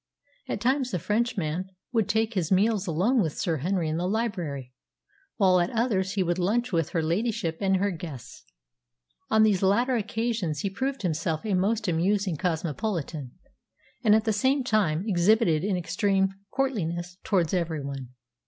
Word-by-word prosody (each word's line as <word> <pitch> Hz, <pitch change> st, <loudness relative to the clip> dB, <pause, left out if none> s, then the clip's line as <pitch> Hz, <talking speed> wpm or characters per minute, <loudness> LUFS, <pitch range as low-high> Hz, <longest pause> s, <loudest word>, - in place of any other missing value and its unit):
At -, -, -3 dB
times 260 Hz, +1 st, +1 dB
the 190 Hz, -, -1 dB
Frenchman 190 Hz, -4 st, -1 dB, 0.2 s
would 225 Hz, -4 st, +1 dB
take 220 Hz, +1 st, +1 dB
his 180 Hz, -5 st, -1 dB
meals 205 Hz, +1 st, +2 dB
alone 195 Hz, +10 st, +2 dB
with 160 Hz, -6 st, -2 dB
Sir 165 Hz, -4 st, 0 dB
Henry 175 Hz, +3 st, -1 dB
in 155 Hz, +1 st, -1 dB
the 175 Hz, +1 st, -1 dB
library, 175 Hz, -, -2 dB, 0.6 s
while 185 Hz, -3 st, +4 dB
at 175 Hz, +1 st, +1 dB
others 210 Hz, -5 st, 0 dB
he 195 Hz, -, +1 dB
would 175 Hz, +1 st, -1 dB
lunch 230 Hz, +7 st, +1 dB
with 165 Hz, -4 st, +1 dB
her 165 Hz, -4 st, -1 dB
ladyship 170 Hz, -1 st, -1 dB
and 190 Hz, -1 st, +3 dB
her 200 Hz, +2 st, +1 dB
guests. 150 Hz, -8 st, -8 dB, 0.9 s
On 220 Hz, 0 st, +5 dB
these 205 Hz, -4 st, +3 dB
latter 235 Hz, +7 st, +3 dB
occasions 220 Hz, -8 st, -1 dB
he 200 Hz, -, -2 dB
proved 265 Hz, +4 st, -3 dB
himself 160 Hz, 0 st, -1 dB
a 210 Hz, -, 0 dB
most 205 Hz, +4 st, +1 dB
amusing 185 Hz, +2 st, +1 dB
cosmopolitan, 160 Hz, -, -3 dB, 0.7 s
and 215 Hz, -2 st, +6 dB
at 220 Hz, -, +3 dB
the 220 Hz, -1 st, +1 dB
same 260 Hz, +6 st, +2 dB
time 200 Hz, -9 st, +1 dB
exhibited 180 Hz, -3 st, +3 dB
an 195 Hz, -2 st, 0 dB
extreme 190 Hz, +3 st, +1 dB, 0.2 s
courtliness 180 Hz, -9 st, -2 dB
towards 180 Hz, -5 st, +1 dB
every 165 Hz, -5 st, -1 dB
one. 135 Hz, -3 st, -6 dB
190 Hz, 160 wpm, -27 LUFS, 165-220 Hz, 0.9 s, and